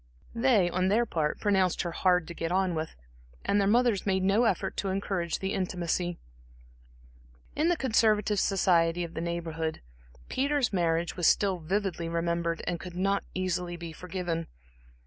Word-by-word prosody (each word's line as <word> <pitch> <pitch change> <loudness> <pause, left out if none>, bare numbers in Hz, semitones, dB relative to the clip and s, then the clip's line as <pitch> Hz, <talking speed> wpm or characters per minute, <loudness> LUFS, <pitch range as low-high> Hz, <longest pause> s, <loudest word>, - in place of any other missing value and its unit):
They, 230 -6 +3
on 185 +1 0
their 220 +5 +3
part 155 -8 -1
pronounced 190 -4 +2
her 175 - -3
hard 180 -1 +2
to 170 - -6
get 165 0 -3
on 185 -1 +1
with, 160 0 -4 0.5
and 205 - +2
their 195 - +2
mothers 235 -2 +3
made 190 -1 +1
no 200 +5 +3
effort 190 - 0
to 195 - -1
encourage 190 -3 -1
the 195 +1 -3
intimacy. 175 -2 -1 1.4
In 315 +3 +2
the 350 - +2
conservative 215 -5 +2
society 175 -3 +2
of 170 -1 -7
the 160 - -4
Neighborhood, 165 -2 -3 0.5
Peter's 280 -3 0
marriage 170 -2 0
was 175 -3 +2
still 195 -3 +3
vividly 175 0 -2
remembered, 170 0 -1
and 175 -1 -2
could 180 -2 -8
not 195 +2 +1
easily 180 -1 -2
be 170 -1 -7
forgiven. 170 -1 -4
180 Hz, 160 wpm, -29 LUFS, 170-200 Hz, 1.4 s, They